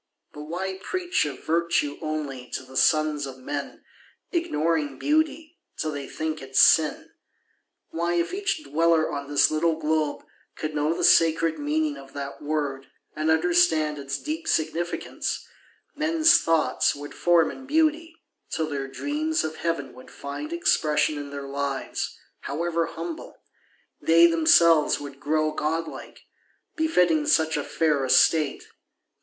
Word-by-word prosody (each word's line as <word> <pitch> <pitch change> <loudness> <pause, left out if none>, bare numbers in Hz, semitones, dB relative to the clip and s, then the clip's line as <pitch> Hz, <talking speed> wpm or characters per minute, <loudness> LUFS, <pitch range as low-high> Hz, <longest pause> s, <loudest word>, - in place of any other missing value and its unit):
But 150 0 -8
why 190 +4 -4
preach 360 - -1
Of 145 -2 -7
virtue 165 -3 0
only 145 -5 -4
to - - -5
the 130 0 -15
sons 155 -1 +2
of 130 -1 -9
men, 140 +2 -6 0.5
Ignoring 155 - -1
beauty, 310 - -1 0.2
till 155 - -2
they 145 -2 -6
think 155 0 -4
it 135 0 -11
sin? 155 +1 +4 0.8
Why, 170 +1 -1
if 170 - -1
each 390 -5 -2
dweller 165 - +2
on 140 -1 -4
this 145 +1 +3
little 160 +1 +1
globe 155 -1 -1 0.3
Could 155 0 -4
know 150 +1 0
the 170 - -2
sacred 165 -1 +4
meaning 150 0 -1
of 135 0 -13
that 140 -1 -7
word 145 -3 -3 0.3
And 155 +1 -1
understand 160 -2 +2
its 140 0 -4
deep 320 - -5
significance, 165 - -2 0.5
Men's 315 +2 +4
thoughts 165 -2 +1
would 145 +1 -9
form 170 -2 +3
in 265 - -11
beauty, 320 +2 +1 0.3
till 160 - -1
their 140 -2 -4
dreams 300 - -2
Of 155 0 -4
heaven 145 -6 -3
would 130 - -14
find 140 - -7
expression 155 - +1
in 145 0 -7
their 140 -1 -7
lives, 140 0 -3 0.2
However 165 +3 -2
humble; 165 0 -7 0.7
they 165 +1 +6
themselves 165 -1 +4
would 140 -1 -9
grow 155 +1 0
Godlike, 160 +2 -4 0.5
befitting 180 - +2
such 160 -1 +3
a 145 - -1
fair 150 -4 0
estate. 140 +3 +3
155 Hz, 140 wpm, -25 LUFS, 145-170 Hz, 0.8 s, they